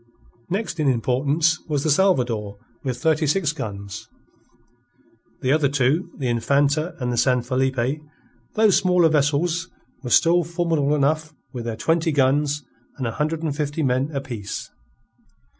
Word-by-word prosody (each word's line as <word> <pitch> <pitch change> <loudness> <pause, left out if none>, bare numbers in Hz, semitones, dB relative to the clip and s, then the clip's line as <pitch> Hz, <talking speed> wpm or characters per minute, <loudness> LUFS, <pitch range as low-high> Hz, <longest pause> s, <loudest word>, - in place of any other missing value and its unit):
Next 195 -2 -3
in 150 - +1
importance 140 +6 +1
was 145 -3 -1
the 155 - +2
Salvador 125 - +1 0.3
with 130 -2 -2
thirty 155 +1 +2
six 155 0 +1
guns; 100 -9 -7 1.3
the 130 -1 +1
other 150 -2 +3
two, 145 +6 +1
the 135 - -2
Infanta 140 +7 +1
and 125 -1 -1
the - - -2
San 125 0 +2
Felipe, 130 +2 0 0.5
though 220 0 +5
smaller 180 -3 +4
vessels, 160 +4 +1 0.3
were 125 - -5
still 170 +7 +4
formidable 165 -4 0
enough 155 +2 0 0.2
with 120 -2 -5
their 115 -1 -3
twenty 165 +3 +1
guns 145 +1 +1 0.3
and 130 - -3
a 115 - -1
hundred 155 +5 -2
and 150 -3 -1
fifty 150 +1 -2
men 130 +1 +1
apiece. 125 -8 -5
145 Hz, 140 wpm, -23 LUFS, 130-160 Hz, 1.3 s, though